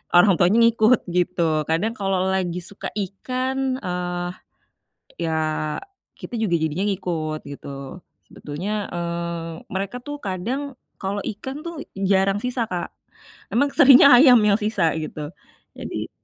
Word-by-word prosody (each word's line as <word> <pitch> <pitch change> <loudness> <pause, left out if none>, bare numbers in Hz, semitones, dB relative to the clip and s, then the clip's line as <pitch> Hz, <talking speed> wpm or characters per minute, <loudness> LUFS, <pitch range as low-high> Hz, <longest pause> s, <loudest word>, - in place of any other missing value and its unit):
orang 185 +2 +7
tuanya 185 +5 +4
ngikut, 230 +1 +4 0.2
gitu. 180 0 +1 0.3
Kadang 210 +8 +1
kalau 195 -1 0
lagi 180 -2 -1
suka 200 - -7
ikan, 255 +7 -3 0.3
eee, 180 0 -2 1.0
ya, 160 - -1 0.9
kita - - -8
juga 180 -6 +1
jadinya 160 +5 -1
ngikut, 165 -5 -2
gitu. 140 0 -9 0.6
Sebetulnya, 165 +8 -5 0.2
eee, 170 -1 -3 0.2
mereka, 195 +5 -3
tuh, 290 +3 -6
kadang 200 +8 -2 0.4
kalau 200 +1 -2
ikan, 265 +8 -7
tuh, 335 -3 -5 0.3
jarang 195 +1 +3
sisa, 250 -1 -1
Kak. 175 -1 -3 0.6
Emang 280 +5 +3
seringnya 275 0 +9
ayam 250 -2 +8
yang 205 -1 +4
sisa, 205 -6 +1
gitu. 155 0 -5 0.5
Jadi - - -5
190 Hz, 125 wpm, -23 LUFS, 175-230 Hz, 1.0 s, seringnya